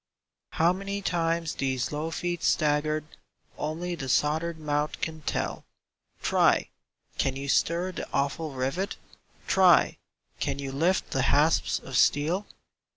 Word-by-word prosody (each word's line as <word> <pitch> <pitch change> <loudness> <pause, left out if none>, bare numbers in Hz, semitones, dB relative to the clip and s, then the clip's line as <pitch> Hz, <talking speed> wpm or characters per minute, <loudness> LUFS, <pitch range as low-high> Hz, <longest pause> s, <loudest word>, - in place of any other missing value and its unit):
How 170 +2 +3
many 200 +1 -4
times 165 -2 0
these 130 -2 -1
low 150 +2 -2
feet 175 +1 -3
staggered, 155 0 +1 0.5
Only 170 +3 -3
the 135 -6 -5
soldered 155 +6 +1
mouth 150 -1 -1
can 160 -1 -4
tell; - - -2 0.6
Try! - - +3 0.5
can 135 -1 +1
you 140 +1 -5
stir 170 +6 +1
the - - -7
awful 145 +3 -1
rivet? 135 +9 -2 0.5
Try! 185 -3 +5 0.4
can - - -1
you 140 -1 -4
lift 165 +7 +1
the 135 - +1
hasps 155 +3 +3
of 135 - -8
steel? 160 +10 +2
155 Hz, 130 wpm, -27 LUFS, 140-175 Hz, 0.6 s, Try